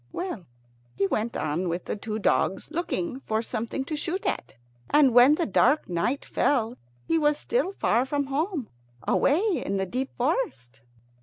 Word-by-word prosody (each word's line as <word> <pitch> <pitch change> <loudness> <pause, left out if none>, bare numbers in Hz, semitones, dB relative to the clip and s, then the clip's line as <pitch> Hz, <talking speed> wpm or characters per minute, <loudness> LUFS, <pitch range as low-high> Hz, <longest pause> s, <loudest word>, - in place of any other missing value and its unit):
Well, 345 - -5 0.5
he 195 - +1
went 215 +4 -1
on 160 +4 -1
with 170 +2 -3
the - - -2
two 215 +1 -4
dogs, 200 +3 0
looking 335 -4 -2
for 220 -3 -2
something 235 +4 -3
to 310 - -3
shoot 350 +5 -3
at; - - -2 0.3
and 285 -4 +5
when 250 +5 +7
the 335 - 0
dark 300 0 +3
night 180 +11 -1
fell 240 -4 +1 0.3
he 330 - +2
was 295 -1 +3
still 465 +2 0
far 235 - +2
from 285 +1 0
home, 290 - -2 0.4
away 305 +8 +3 0.2
in 195 - -1
the 190 - 0
deep 255 +7 -3
forest. 245 - -2
260 Hz, 165 wpm, -26 LUFS, 215-305 Hz, 0.5 s, when